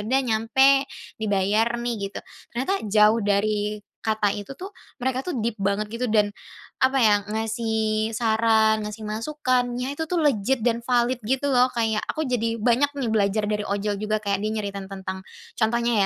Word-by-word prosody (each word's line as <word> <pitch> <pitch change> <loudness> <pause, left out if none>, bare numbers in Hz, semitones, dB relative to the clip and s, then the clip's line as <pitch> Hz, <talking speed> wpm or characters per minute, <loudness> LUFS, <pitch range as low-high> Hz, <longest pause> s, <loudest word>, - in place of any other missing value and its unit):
udah 265 +3 +2
nyampe, 240 +3 +3 0.5
dibayar 205 +1 +2
nih 240 0 -1
gitu. 200 - -7 0.4
Ternyata 260 +10 -1 0.2
jauh 210 +2 +5
dari 210 +1 0 0.2
kata 215 -2 +1
itu 205 +4 -7
tuh 365 +8 -8 0.3
mereka 260 +1 -1
tuh 360 - -3
deep 230 -1 -1
banget 200 +2 0
gitu 230 +3 -4
dan, 210 -2 +4 0.6
apa 265 +1 +3
ya, 215 -3 +5
ngasih 220 0 -1
saran 220 -1 +2
ngasih 210 +1 -6
masukan 255 +3 0 0.2
ya 255 - -2
itu 320 - -2
tuh 340 +1 -1
legit 265 -3 +1
dan 235 0 0
valid 245 0 +1
gitu 265 +5 0
loh, 255 -1 +3
kayak 225 -3 0
aku 315 -3 -3
jadi 230 -2 -1
banyak 250 +5 +2
nih 250 - -1
belajar 210 -1 +1
dari 210 0 -1
ojol 205 0 -1
juga 215 +1 -1
kayak 200 -1 -1
dia 215 - 0
nyeritain 200 -1 -5
tentang, 190 0 -6 0.3
contohnya 235 +1 +1
220 Hz, 170 wpm, -24 LUFS, 210-245 Hz, 0.6 s, jauh